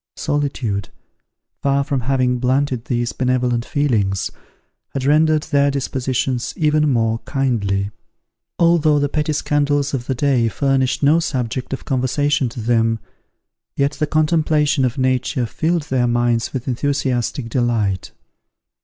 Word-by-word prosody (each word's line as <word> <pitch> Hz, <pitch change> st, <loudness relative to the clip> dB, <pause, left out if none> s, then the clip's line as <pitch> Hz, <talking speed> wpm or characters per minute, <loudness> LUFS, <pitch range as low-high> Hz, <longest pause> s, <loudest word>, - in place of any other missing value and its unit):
Solitude, 135 Hz, -9 st, -2 dB, 0.7 s
far 140 Hz, 0 st, +2 dB
from 140 Hz, -1 st, -1 dB
having 125 Hz, 0 st, +1 dB
blunted 130 Hz, -1 st, 0 dB
these 120 Hz, -1 st, -1 dB
benevolent 125 Hz, -2 st, 0 dB
feelings, 110 Hz, -10 st, 0 dB, 0.6 s
had 135 Hz, -, -1 dB
rendered 155 Hz, +1 st, +3 dB
their 140 Hz, -2 st, +2 dB
dispositions 130 Hz, -2 st, -2 dB
even 150 Hz, -1 st, +2 dB
more 115 Hz, -3 st, +1 dB
kindly. 105 Hz, -8 st, -1 dB, 0.7 s
Although 165 Hz, -3 st, +4 dB
the 145 Hz, 0 st, +1 dB
petty 150 Hz, +1 st, -1 dB
scandals 145 Hz, -1 st, 0 dB
of 125 Hz, -3 st, -3 dB
the 130 Hz, -, -1 dB
day 125 Hz, -3 st, +2 dB
furnished 135 Hz, +2 st, 0 dB
no 150 Hz, +4 st, +5 dB
subject 130 Hz, -6 st, -3 dB
of 135 Hz, -, -5 dB
conversation 135 Hz, +1 st, +1 dB
to 120 Hz, -, -8 dB
them, 115 Hz, 0 st, +2 dB, 0.8 s
yet 140 Hz, 0 st, +2 dB
the 150 Hz, -, -2 dB
contemplation 155 Hz, -2 st, +2 dB
of 125 Hz, +2 st, -2 dB
nature 130 Hz, 0 st, 0 dB
filled 165 Hz, +7 st, -1 dB
their 130 Hz, -5 st, 0 dB
minds 120 Hz, -1 st, +1 dB
with 130 Hz, -1 st, -5 dB
enthusiastic 130 Hz, -1 st, -1 dB
delight. 115 Hz, -6 st, -1 dB
130 Hz, 125 wpm, -19 LUFS, 120-145 Hz, 0.8 s, no